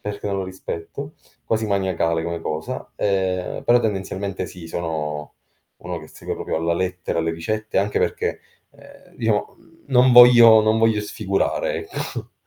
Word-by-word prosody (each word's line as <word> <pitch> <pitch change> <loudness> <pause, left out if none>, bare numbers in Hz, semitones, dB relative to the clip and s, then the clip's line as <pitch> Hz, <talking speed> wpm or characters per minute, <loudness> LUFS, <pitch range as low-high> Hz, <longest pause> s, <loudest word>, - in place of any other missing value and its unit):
perché 105 0 -5
non 100 -1 -1
lo 95 - -2
rispetto, 95 - -7 0.3
quasi 110 0 0
maniacale 90 -5 0
come 85 -1 -3
cosa. 80 -1 -5
Ehm, 95 -2 -1
però 120 +1 +5
tendenzialmente 95 -3 -3
sì, 85 0 -10
sono 75 -3 -4 0.4
uno 90 0 -5
che 80 0 -12
segue - - -6
proprio - - -4
alla 80 +1 0
lettera 90 -1 -2
le 80 0 -1
ricette 110 +6 -2
anche 100 +1 0
perché, - - -1 0.3
ehm, - - -18
diciamo 110 -3 -1 0.3
non 130 -2 +4
voglio 120 -2 +9
non 110 +1 +2
voglio 110 -1 +3
sfigurare, 100 -1 -1 0.2
ecco. - - -6
95 Hz, 150 wpm, -22 LUFS, 85-110 Hz, 0.4 s, voglio